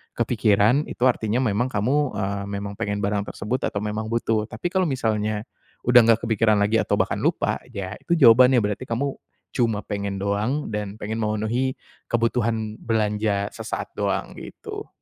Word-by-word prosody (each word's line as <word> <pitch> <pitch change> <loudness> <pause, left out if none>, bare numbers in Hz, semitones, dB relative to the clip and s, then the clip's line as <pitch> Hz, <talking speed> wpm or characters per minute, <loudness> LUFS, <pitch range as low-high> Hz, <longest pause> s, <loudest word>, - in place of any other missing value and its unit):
kepikiran, 115 +3 +2
itu 120 - -5
artinya 120 -1 +2
memang 115 +1 +1
kamu, 130 +5 0
eee, 100 0 -2
memang 100 0 -4
pengen 100 0 -2
barang 100 0 -1
tersebut 125 +5 -2
atau 100 - -3
memang 105 +1 -3
butuh. 110 -1 0
Tapi 175 - -4
kalau 185 -2 +2
misalnya 110 -5 -1 0.4
udah 125 0 +7
enggak 115 0 +4
kepikiran 110 -1 +3
lagi 105 +2 +2
atau - - +1
bahkan - - 0
lupa, - - 0
ya 100 +1 -6
itu 170 - 0
jawabannya, 125 -3 +6
berarti 105 +5 -3
kamu 135 +5 -1 0.4
cuma 115 -4 0
pengen 100 -1 -3
doang 110 +8 -1
dan 105 -1 -4
pengen 110 +1 -4
memenuhi 110 +4 -1 0.3
kebutuhan 115 -2 0
belanja 105 -2 0
sesaat - - -5
doang, - - -1
gitu. - - -8
110 Hz, 155 wpm, -24 LUFS, 105-120 Hz, 0.4 s, udah